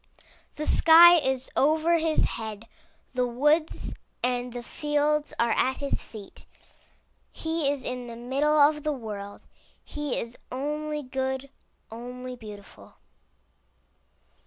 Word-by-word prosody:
The 305 - -4
sky 340 +2 +8
is 265 -3 -2
over 320 +4 +3
his 320 -1 +1
head, 220 -1 -4 0.5
the 250 -1 +1
woods 295 +6 +1 0.3
and 245 0 -1
the 240 0 -6
fields 295 +2 0
are 235 0 +2
at 260 +1 +1
his 280 -1 -2
feet. 210 -3 -12 0.8
He 320 -3 -1
is 280 -2 -2
in 250 -1 -5
the 235 - -8
middle 275 +6 0
of 300 +1 +5
the 300 0 -1
world. 205 -5 -7 0.4
He 295 -2 -3
is 235 +1 -7
only 300 +3 -3
good, 265 +1 -3 0.4
only 250 +2 -7
beautiful. 210 -4 -12
265 Hz, 120 wpm, -27 LUFS, 245-300 Hz, 0.8 s, sky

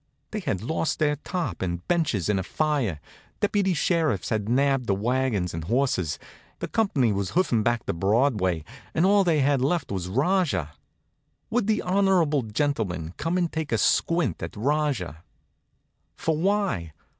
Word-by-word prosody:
They 215 - -2
had 110 - -2
lost 160 +5 -1
their 150 -2 +1
top 150 - -4
and 85 -2 -3
benches 155 - +1
in 105 -2 +1
a - - -2
fire, 135 - -1 0.4
deputy 200 -3 +1
sheriffs 155 - +1
had 110 -1 -1
nabbed 135 0 +2
the 100 - +2
wagons 115 -4 0
and 80 -1 -5
horses, 95 - 0 0.4
the - - -4
company 150 - +1
was 100 -1 -2
hoofing 145 -11 +2
back 120 +1 0
to - - -1
Broadway, 95 - +1 0.3
and 165 - +3
all 200 +1 +5
they 165 -5 +2
had 135 -1 +2
left 145 - 0
was 95 -3 -3
Rajah. 140 - +1 0.8
Would 225 -3 +1
the 215 -1 +1
honorable 180 -6 +2
gentleman 105 - -2
come 165 +3 -1
and 175 -2 0
take 160 -3 -3
a 115 - +2
squint 165 - +1
at 80 - -6
Rajah? 130 - -1 0.9
For 160 - 0
why? 185 - 0
135 Hz, 155 wpm, -25 LUFS, -, 0.9 s, all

